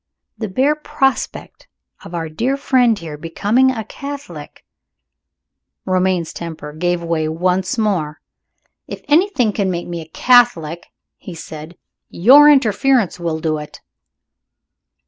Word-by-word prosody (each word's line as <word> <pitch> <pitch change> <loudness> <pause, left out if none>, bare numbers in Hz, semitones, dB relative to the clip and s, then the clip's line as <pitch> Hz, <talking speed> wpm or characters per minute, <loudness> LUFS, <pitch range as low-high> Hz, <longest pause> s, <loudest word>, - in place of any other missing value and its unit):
The 220 - -5
bare 265 +9 +2
prospect 270 -3 -3 0.4
of 175 - -9
our 165 -1 -3
dear 240 - -2
friend 250 -5 +2
here 160 -5 -8
becoming 210 +11 +1
a 230 -4 -3
Catholic 280 +5 -9 0.6
" - - -61
Romayne's 185 -2 0
temper 160 -3 -8
gave 175 +2 -1
way 165 -2 -1
once 180 +5 -1
more. 180 -9 -1 0.7
"If - - -8
anything 295 - +2
can 195 -2 -1
make 175 -1 -4
me 170 -1 -5
a 160 - -11
Catholic," 175 -8 +2 0.3
he 180 - -10
said, 160 +1 -10 0.3
"your 275 +11 +7
interference 255 - +2
will 165 -2 -3
do 155 -1 -1
it." 150 - -10
185 Hz, 125 wpm, -18 LUFS, 165-250 Hz, 0.7 s, your